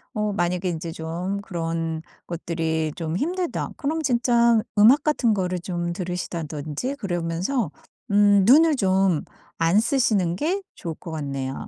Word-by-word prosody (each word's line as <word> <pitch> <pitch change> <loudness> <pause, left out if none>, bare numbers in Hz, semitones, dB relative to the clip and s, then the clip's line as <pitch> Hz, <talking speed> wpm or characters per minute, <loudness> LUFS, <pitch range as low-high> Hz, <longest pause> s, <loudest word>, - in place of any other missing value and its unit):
어 210 -1 0
만약에 180 -1 0
인제 165 0 -4
좀 175 +5 -4
그런 165 -4 -3 0.3
것들이 160 -2 -2
좀 165 -1 -3
힘들다 355 - -2
그럼 315 +2 -1
진짜 235 -3 +3 0.2
음악 255 +8 +7
같은 255 -7 +2
거를 180 -2 -1
좀 175 -1 -3
들으시다든지 170 - -4
그러면서 180 - -2 0.4
음 205 -1 +5
눈을 310 +4 +6
좀 190 - +2 0.4
안 165 +5 +4
쓰시는 220 -8 +1
게 360 - -1
좋을 165 -2 -5
것 165 - -9
같네요. 140 -3 -4
180 Hz, 265 characters per minute, -24 LUFS, 165-235 Hz, 0.4 s, 음악